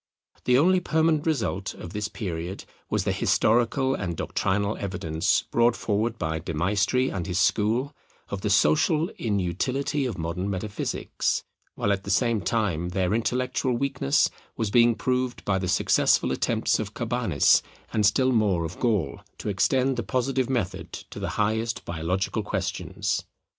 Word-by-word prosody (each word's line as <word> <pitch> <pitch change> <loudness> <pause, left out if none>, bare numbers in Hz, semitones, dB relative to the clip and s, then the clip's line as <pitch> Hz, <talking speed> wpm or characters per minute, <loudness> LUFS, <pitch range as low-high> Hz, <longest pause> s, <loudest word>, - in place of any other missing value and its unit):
The 125 0 +5
only 185 +6 +4
permanent 160 -2 +1
result 110 - -1
of 85 - -9
this 105 0 -2
period 90 -3 -5 0.2
was - - 0
the - - 0
historical 120 +4 +2
and 90 -9 -3
doctrinal 100 +2 0
evidence 85 -5 0
brought 120 0 +3
forward 110 +2 -1
by 80 -3 -2
De 85 0 -5
Maistre 105 - +1
and 95 -1 -3
his 90 -2 -2
school, 115 - +1 0.4
of 100 - -4
the 105 - -1
social 155 - +3
inutility 120 - -1
of 110 -8 -5
modern 85 +4 -3
metaphysics, 100 +2 -2 0.3
while 100 - +1
at 100 0 -3
the - - -7
same 115 +2 +2
time 90 -4 0
their 90 +1 0
intellectual 125 +2 0
weakness 135 - +2 0.3
was 110 -3 -1
being 120 0 +5
proved 125 0 -1
by 95 -2 +1
the 90 - -2
successful 90 - +3
attempts - - +1
of - - -5
Cabanis, - - +3 0.3
and 110 - +2
still 130 +6 +3
more 100 -8 +2
of 80 +2 -7
Gall, 105 - 0 0.2
to - - -4
extend 130 +7 +2
the - - 0
Positive 130 0 -1
method 120 -9 -2
to - - -8
the - - -3
highest 110 +2 0
biological 85 +3 -1
questions. - - -2
105 Hz, 155 wpm, -26 LUFS, 95-125 Hz, 0.4 s, The